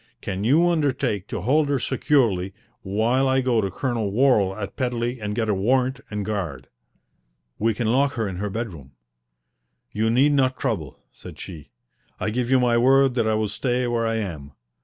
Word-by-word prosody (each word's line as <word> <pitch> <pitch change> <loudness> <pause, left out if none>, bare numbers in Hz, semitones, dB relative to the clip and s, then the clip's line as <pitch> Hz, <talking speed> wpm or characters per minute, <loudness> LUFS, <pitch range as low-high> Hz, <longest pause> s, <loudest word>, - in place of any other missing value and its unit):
Can 95 +1 -4
you 155 +10 +4
undertake 135 - 0
to 110 -6 -4
hold 145 - +2
her 140 - +2
securely 110 -9 +1 0.3
while 115 +7 +1
I 130 0 +3
go 125 -3 +2
to 100 - -1
Colonel 115 0 -2
Worral 105 -5 +3
at 100 - -5
Pedley 125 -1 -2
and 105 0 -3
get 110 -1 -1
a 105 - +2
warrant 125 +6 +1
and 105 -1 -3
a - - -3
guard?" 95 -10 -4 0.9
"We 115 0 +1
can 120 - -2
lock 135 +5 +2
her 110 -3 -2
in 95 -2 -5
her 105 +2 -3
bedroom." 90 - -6 1.0
"You 110 +1 0
need 130 +6 +4
not 130 -2 +2
trouble," 95 - -3
said - - -12
she. 80 -6 -9 0.5
"I 110 - -1
give 125 +1 -1
you 130 0 +4
my 120 -1 +3
word 135 +1 +4
that 115 -3 0
I 110 - +2
will 110 0 0
stay 125 +4 -1
where 120 -1 0
I 115 - 0
am. 80 -10 -5
115 Hz, 190 wpm, -23 LUFS, 100-130 Hz, 1.0 s, you